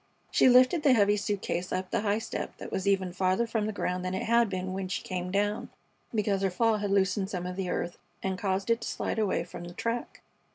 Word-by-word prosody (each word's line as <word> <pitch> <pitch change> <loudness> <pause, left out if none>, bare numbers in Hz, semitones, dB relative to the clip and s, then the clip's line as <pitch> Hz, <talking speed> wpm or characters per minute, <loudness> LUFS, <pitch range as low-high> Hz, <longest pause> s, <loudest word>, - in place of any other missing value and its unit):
She - - +5
lifted 255 +6 +6
the 280 -3 +5
heavy 205 -3 +4
suit 205 -1 -2
case 175 +2 -2
up 185 0 -2
the 230 - +1
high 205 -1 +1
step 225 - -5
that - - -8
was 190 - -2
even 190 -2 +2
farther 185 +4 +1
from 220 -2 -1
the - - -1
ground 180 -3 -2
than 185 0 -2
it - - -2
had 235 -1 +3
been 185 -1 -3
when 190 0 -3
she 185 - -3
came 180 -1 -3
down, 205 +2 0 0.4
because 205 -3 0
her 195 - +2
fall 225 +4 +2
had 205 -1 -2
loosened 195 0 +2
some 180 -3 -3
of 180 0 -4
the 190 -1 -3
earth 175 - -3 0.2
and 190 -1 0
caused 195 +3 -1
it 230 0 +2
to - - -4
slide - - -2
away 200 -5 +1
from 175 0 -9
the 175 0 -9
track. 230 +3 -3
195 Hz, 245 wpm, -29 LUFS, 185-220 Hz, 0.4 s, lifted